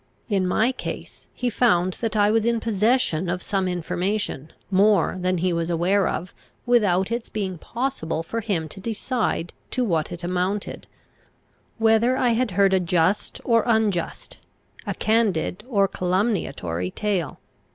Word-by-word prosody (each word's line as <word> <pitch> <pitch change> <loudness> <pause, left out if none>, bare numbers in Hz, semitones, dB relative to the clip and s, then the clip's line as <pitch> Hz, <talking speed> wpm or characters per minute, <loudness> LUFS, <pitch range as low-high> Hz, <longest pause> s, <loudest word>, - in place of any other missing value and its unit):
In 195 -3 +1
my 220 +7 +2
case 255 - -7
he 245 -1 -2
found 185 -6 +2
that 225 -2 -1
I 205 0 +4
was 225 0 +2
in 235 0 +1
possession 215 -5 +1
of 175 0 -2
some 195 -2 0
information, 180 -2 -2 0.2
more 195 -2 +4
than 185 0 0
he 180 +1 +1
was 170 0 -1
aware 180 +4 +2
of, 180 +2 -4 0.3
without 205 -5 +3
its 235 0 -3
being 190 -5 -3
possible 235 -11 -3
for 230 +7 -3
him 190 -7 -1
to 190 - -10
decide 225 -4 -2 0.2
to 255 - 0
what 165 -9 0
it 175 0 -7
amounted, 185 +3 -2 0.9
whether 225 +3 +3
I 250 - +2
had 235 +1 +1
heard 195 -1 +5
a 190 - +4
just 180 +2 0
or 230 -2 +4
unjust, 215 -7 0 0.5
a - - -2
candid 215 -6 +1
or 200 -5 +3
calumniatory 180 - -1
tale. 185 - -2
195 Hz, 150 wpm, -24 LUFS, 175-225 Hz, 0.9 s, heard